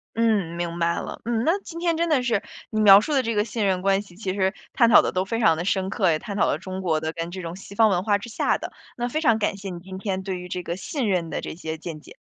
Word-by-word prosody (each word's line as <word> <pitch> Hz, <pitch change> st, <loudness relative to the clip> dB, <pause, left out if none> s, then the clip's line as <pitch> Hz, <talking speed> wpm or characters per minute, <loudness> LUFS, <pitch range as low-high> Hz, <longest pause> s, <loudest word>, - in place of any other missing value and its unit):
嗯， 215 Hz, -7 st, +1 dB
明 170 Hz, -1 st, -3 dB
白 170 Hz, 0 st, +1 dB
了， -, -, -7 dB
嗯。 230 Hz, 0 st, 0 dB
那 340 Hz, +5 st, +3 dB
今 335 Hz, -2 st, -8 dB
天 340 Hz, -1 st, +1 dB
真 335 Hz, +1 st, 0 dB
的 280 Hz, -5 st, +3 dB
是， 235 Hz, -4 st, 0 dB, 0.3 s
你 215 Hz, -, 0 dB
描 200 Hz, -1 st, +9 dB
述 300 Hz, +8 st, -2 dB
的 265 Hz, -2 st, +3 dB
这 230 Hz, -, -1 dB
个 210 Hz, +1 st, +1 dB
信 215 Hz, -1 st, -2 dB
任 185 Hz, -2 st, +1 dB
关 195 Hz, +1 st, +2 dB
系 195 Hz, -4 st, -16 dB
其 190 Hz, -3 st, -3 dB
实 190 Hz, -1 st, +1 dB, 0.2 s
探 235 Hz, -2 st, +4 dB
讨 -, -, +8 dB
的 -, -, -1 dB
都 185 Hz, 0 st, +1 dB
非 225 Hz, +4 st, -3 dB
常 165 Hz, -8 st, +4 dB
的 165 Hz, -, -3 dB
深 190 Hz, 0 st, 0 dB
刻， 190 Hz, -4 st, +2 dB
也 155 Hz, -, 0 dB
探 200 Hz, -, -6 dB
讨 -, -, +3 dB
了 -, -, +1 dB
中 185 Hz, +2 st, -6 dB
国 160 Hz, -4 st, +1 dB
的 160 Hz, +1 st, -3 dB
跟 165 Hz, +1 st, -5 dB
这 185 Hz, +1 st, -6 dB
种 170 Hz, 0 st, -6 dB
西 195 Hz, +1 st, -11 dB
方 220 Hz, +1 st, +5 dB
文 180 Hz, -2 st, +1 dB
化 205 Hz, -1 st, +2 dB
之 205 Hz, +4 st, -9 dB
下 -, -, +1 dB
的。 -, -, -7 dB, 0.2 s
那 240 Hz, 0 st, -1 dB
非 310 Hz, +6 st, -2 dB
常 230 Hz, -7 st, +3 dB
感 205 Hz, -, 0 dB
谢 195 Hz, 0 st, -7 dB
你 175 Hz, -, -6 dB
今 185 Hz, +1 st, -9 dB
天 190 Hz, -1 st, -2 dB
对 190 Hz, -1 st, -4 dB
于 180 Hz, 0 st, -8 dB
这 180 Hz, -, -4 dB
个 170 Hz, -, -3 dB
信 240 Hz, -, -3 dB
任 175 Hz, -3 st, 0 dB
的 -, -, -3 dB
这 -, -, -6 dB
些 160 Hz, -1 st, -5 dB
见 160 Hz, -1 st, -7 dB
解。 -, -, -15 dB
195 Hz, 330 characters per minute, -24 LUFS, 180-225 Hz, 0.3 s, 描